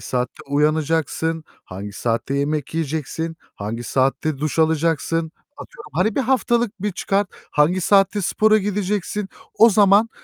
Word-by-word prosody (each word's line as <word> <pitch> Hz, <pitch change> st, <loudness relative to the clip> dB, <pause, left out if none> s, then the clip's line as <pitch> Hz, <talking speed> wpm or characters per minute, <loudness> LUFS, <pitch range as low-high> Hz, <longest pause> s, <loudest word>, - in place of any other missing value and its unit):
saatte 125 Hz, 0 st, -3 dB
uyanacaksın, 155 Hz, +2 st, 0 dB, 0.2 s
hangi 100 Hz, +2 st, -8 dB
saatte 115 Hz, +5 st, -2 dB
yemek 145 Hz, +1 st, -2 dB
yiyeceksin, 160 Hz, +1 st, -3 dB, 0.2 s
hangi 110 Hz, +4 st, -5 dB
saatte 135 Hz, +3 st, 0 dB
duş 155 Hz, +2 st, -3 dB
alacaksın. 160 Hz, 0 st, +1 dB, 0.2 s
Atıyorum, 485 Hz, -4 st, -12 dB
hani, 200 Hz, +4 st, +1 dB
bir -, -, +1 dB
haftalık 240 Hz, -5 st, 0 dB
bir 210 Hz, -2 st, -1 dB
çıkart, 195 Hz, +1 st, 0 dB, 0.2 s
hangi 165 Hz, +5 st, +2 dB
saatte 200 Hz, +2 st, +3 dB
spora 215 Hz, +4 st, +3 dB
gideceksin, 205 Hz, 0 st, -2 dB, 0.3 s
o 230 Hz, +1 st, +6 dB
zaman 205 Hz, +2 st, +5 dB
165 Hz, 130 wpm, -21 LUFS, 150-205 Hz, 0.3 s, o